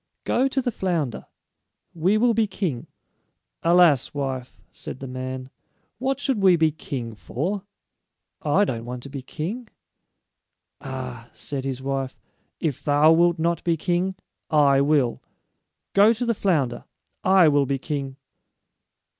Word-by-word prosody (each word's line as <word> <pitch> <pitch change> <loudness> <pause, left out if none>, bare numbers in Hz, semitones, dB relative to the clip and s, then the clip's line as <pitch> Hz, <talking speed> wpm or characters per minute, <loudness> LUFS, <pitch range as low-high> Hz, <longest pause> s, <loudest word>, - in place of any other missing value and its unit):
Go 260 +3 +2
to 265 -1 -1
the 245 - 0
flounder. 170 - -2 0.7
We 180 +6 +2
will 235 +1 +3
be 220 -1 +2
king." 175 - -3 0.7
"Alas, 170 -6 +4
wife," 130 -3 -4
said - - -8
the 135 - -6
man, 130 0 -6 0.5
"what 265 +1 -1
should 270 -7 0
we 190 -2 +6
be 160 -2 +3
king 130 -6 -5
for? 165 - -4 0.7
I 180 +7 +3
don't 115 - -3
want 125 0 -6
to 140 - -8
be 140 -1 -5
king." 180 - -5 1.1
"Ah," 125 -3 -6
said 135 -2 -4
his 130 -1 -3
wife, 135 -1 -2 0.4
"if 150 -6 -2
thou 150 +1 +5
wilt 170 +1 +4
not 170 +1 0
be 170 -1 +1
king, 180 +4 0 0.3
I 140 -3 +4
will. 140 -4 +2 0.7
Go 205 +3 +6
to 240 +2 -3
the 235 - +2
flounder. 155 - 0 0.4
I 190 -3 +6
will 145 -2 +3
be 140 0 0
king." 140 -1 -4
150 Hz, 140 wpm, -24 LUFS, 130-190 Hz, 1.1 s, we